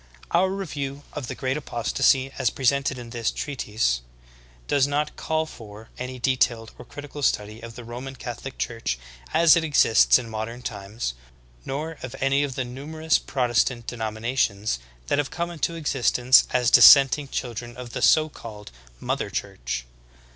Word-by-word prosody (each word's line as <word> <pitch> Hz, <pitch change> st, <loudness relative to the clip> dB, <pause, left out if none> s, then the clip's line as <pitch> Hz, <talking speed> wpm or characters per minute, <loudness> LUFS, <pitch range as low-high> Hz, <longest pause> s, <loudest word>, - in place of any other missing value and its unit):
23. 170 Hz, -, +4 dB
Our 190 Hz, -, +2 dB
review 145 Hz, -8 st, -4 dB
of 145 Hz, -4 st, -5 dB
the -, -, -5 dB
Great 130 Hz, +2 st, -2 dB
Apostasy 135 Hz, 0 st, +1 dB
as 130 Hz, -4 st, +3 dB
presented 135 Hz, +2 st, +1 dB
in 120 Hz, -2 st, -9 dB
this 115 Hz, -2 st, -1 dB
treatise, 105 Hz, -, -1 dB, 0.7 s
does 140 Hz, -1 st, +3 dB
not 150 Hz, +1 st, -1 dB
call 160 Hz, 0 st, -1 dB
for 110 Hz, -6 st, -12 dB
any 125 Hz, 0 st, -5 dB
detailed 120 Hz, -3 st, +1 dB
or -, -, -10 dB
critical 145 Hz, 0 st, -9 dB
study 105 Hz, -4 st, 0 dB
of 115 Hz, -1 st, -9 dB
the 120 Hz, -, -9 dB
Roman 125 Hz, +3 st, -7 dB
Catholic 125 Hz, +1 st, -7 dB
Church 115 Hz, -, -2 dB, 0.3 s
as 165 Hz, -2 st, +6 dB
it 170 Hz, -, +1 dB
exists 145 Hz, -7 st, +5 dB
in 125 Hz, -2 st, -6 dB
modern 115 Hz, +2 st, -5 dB
times. 100 Hz, -, -4 dB, 0.5 s
nor 155 Hz, +4 st, -4 dB
of 130 Hz, 0 st, -7 dB
any 135 Hz, +1 st, +2 dB
of 140 Hz, -3 st, -2 dB
the 130 Hz, -2 st, -2 dB
numerous 155 Hz, +6 st, -1 dB
Protestant 120 Hz, -2 st, 0 dB
denominations 110 Hz, -, -1 dB, 0.3 s
that 140 Hz, -, 0 dB
have 145 Hz, -, -1 dB
come 170 Hz, 0 st, -3 dB
into 170 Hz, 0 st, -2 dB
existence 130 Hz, -4 st, +3 dB
as 125 Hz, -2 st, +2 dB
dissenting 135 Hz, +3 st, +8 dB
children 120 Hz, -2 st, -5 dB
of 125 Hz, -1 st, -8 dB
the -, -, -4 dB
so 155 Hz, 0 st, +5 dB
called 105 Hz, -, -10 dB, 0.3 s
"Mother -, -, -2 dB
Church." -, -, -4 dB
125 Hz, 160 wpm, -24 LUFS, 115-145 Hz, 0.7 s, dissenting